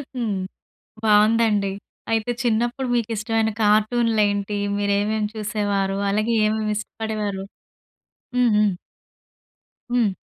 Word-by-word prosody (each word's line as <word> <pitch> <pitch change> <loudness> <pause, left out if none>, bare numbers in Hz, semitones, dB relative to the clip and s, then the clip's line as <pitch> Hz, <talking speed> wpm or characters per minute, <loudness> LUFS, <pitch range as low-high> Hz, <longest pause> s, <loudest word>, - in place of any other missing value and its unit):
హ్మ్. 230 -5 -1 0.7
బావుందండి. 210 -1 +3 0.4
అయితే 225 +1 0
చిన్నప్పుడు 240 +3 0
మీకిష్టమైన 225 -1 0
కార్టూన్‌‌లేంటి? 210 -1 +2 0.2
మీరేమేమి 205 +1 0
చూసేవారు? 205 -2 -1
అలాగే 215 +3 0
ఏమేమి 215 0 0
ఇష్టపడేవారు? 210 -2 -4 1.0
హుహు. 225 -4 +4 1.3
హ్మ్. 235 -4 +3
215 Hz, 75 wpm, -22 LUFS, 205-225 Hz, 1.3 s, హుహు